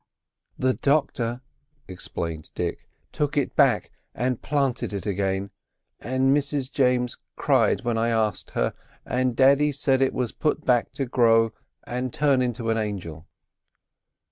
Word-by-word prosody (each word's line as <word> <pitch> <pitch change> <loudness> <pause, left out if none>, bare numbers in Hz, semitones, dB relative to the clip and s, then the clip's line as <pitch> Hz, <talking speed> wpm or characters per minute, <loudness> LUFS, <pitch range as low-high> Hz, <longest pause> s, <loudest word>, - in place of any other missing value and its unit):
"The 130 0 +2
doctor," 125 -5 0 0.5
explained 85 -3 -5
Dick, - - -4 0.2
"took 145 -1 -1
it 140 - 0
back - - +3 0.2
and 125 0 -1
planted 135 -7 -1
it 100 - -4
again; 100 -1 -1 0.5
and 130 +3 +2
Mrs 140 -2 -1
James 125 -2 +1 0.2
cried - - +2
when 115 -1 -1
I 115 +1 +1
asked 110 -3 0
her, - - +1 0.3
and 125 -1 0
daddy 140 +3 +5
said 135 -1 +1
it 135 - +2
was 125 -3 -1
put 155 0 -1
back 120 -2 +2
to 135 - -2
grow 115 -3 +3 0.3
and 125 +1 -3
turn 140 -2 +2
into 120 -2 -1
an 115 - +1
angel." 90 -6 -5
125 Hz, 140 wpm, -25 LUFS, 110-135 Hz, 0.5 s, daddy